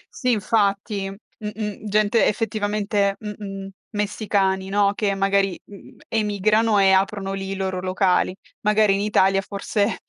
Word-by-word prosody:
Sì, 255 - -1
infatti. 200 -2 0
Mh-mh, 210 +1 -7
gente 215 +2 +3
effettivamente, 205 -2 0
mh-mh, 200 -2 -7 0.3
messicani, 200 -2 0
no, 200 0 +2
che, 200 -2 0
magari, 195 -1 +1
m 200 -1 -14
emigrano 215 0 +2
e 195 -1 +5
aprono 195 0 +1
lì 195 0 -4
i 195 - -3
loro 190 -1 -2
locali. 185 0 +1 0.3
Magari 210 -1 +3
in 195 - 0
Italia, 195 -1 +3
forse, 200 +2 -1
200 Hz, 130 wpm, -22 LUFS, 195-210 Hz, 0.3 s, e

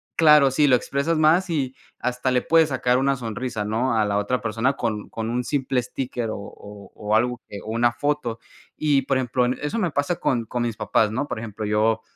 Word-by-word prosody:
claro, 150 -4 +6
sí, 145 +3 +3
lo 130 - +6
expresas 140 +6 -1
más 165 +4 +3
y 135 -5 -1 0.2
hasta 125 +1 -2
le 125 -1 +1
puedes 160 -1 +4
sacar 125 -2 +1
una 135 0 +2
sonrisa, 120 -2 -4
¿no?, 115 +3 0
a 110 - +3
la 100 0 0
otra 115 +5 -1
persona 115 +4 0
con 110 -5 -3
con 115 0 -4
un 125 +1 -1
simple 130 -1 0
sticker 125 -2 -4
o 110 - -4
o 100 0 -11
o 105 +1 -1
algo 125 +2 +1
que 100 - -7
o 110 - -5
una 120 +1 +2
foto. 125 -2 -2 0.4
Y 145 -3 +2
por 135 0 0
ejemplo, 125 -1 +1
en 125 +1 -1
eso 150 +10 -2
me 180 - +1
pasa 145 +5 -1
con 120 -3 0
con 120 +2 -3
mis 115 -2 -3
papás, 105 -1 +1
¿no?, 130 +6 -2
Por - - -4
ejemplo, 110 -1 -6
yo, 110 +1 +1
125 Hz, 220 wpm, -23 LUFS, 110-140 Hz, 0.4 s, claro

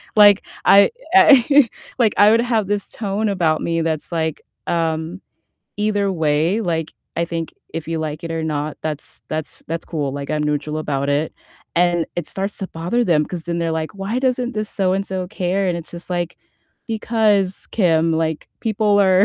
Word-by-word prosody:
Like 205 -1 +7 0.2
I 200 0 +7 0.2
I 285 -7 +7 0.3
like, 220 -4 +4
I 205 +1 +7
would 230 - +4
have 225 -5 0
this 205 -1 -1
tone 210 0 -2
about 170 -5 +1
me 165 0 0
that's 160 -2 -2
like, 160 -2 -1 0.3
um, 165 +2 -1 0.6
either 205 -2 +1
way, 160 +5 +1
like, 165 -6 -2 0.2
I 170 - +1
think 165 -1 -4 0.2
if 165 -1 -5
you 165 -1 -1
like 155 -1 -4
it 165 - -5
or 165 -1 -2
not, 150 -1 -2
that's 155 -1 -5
that's 155 -1 -4
that's 165 0 -3
cool. 145 -5 -3
Like, 140 +1 -5
I'm 150 0 0
neutral 150 +1 -1
about 140 -2 -2
it. 145 +2 0 0.4
And 175 -1 +3
it 175 -3 -3
starts 195 +1 -3
to 190 - -4
bother 175 +9 -1
them 155 -6 +3
'cause 175 -3 -6
then 170 -1 -2
they're 165 -1 -1
like, 160 -1 -3
"Why 200 +6 -2
doesn't 255 -1 0
this 215 -1 -2
so-and-so 190 -1 -1
care?" 190 -1 -1
And 175 - 0
it's 170 - -8
just 170 +1 -8
like, 175 -1 -2 0.5
because 215 -4 +1
Kim, 165 -5 +3
like 160 -1 -1
people 210 -2 +2
are 190 0 +5
175 Hz, 180 wpm, -20 LUFS, 160-205 Hz, 0.6 s, Like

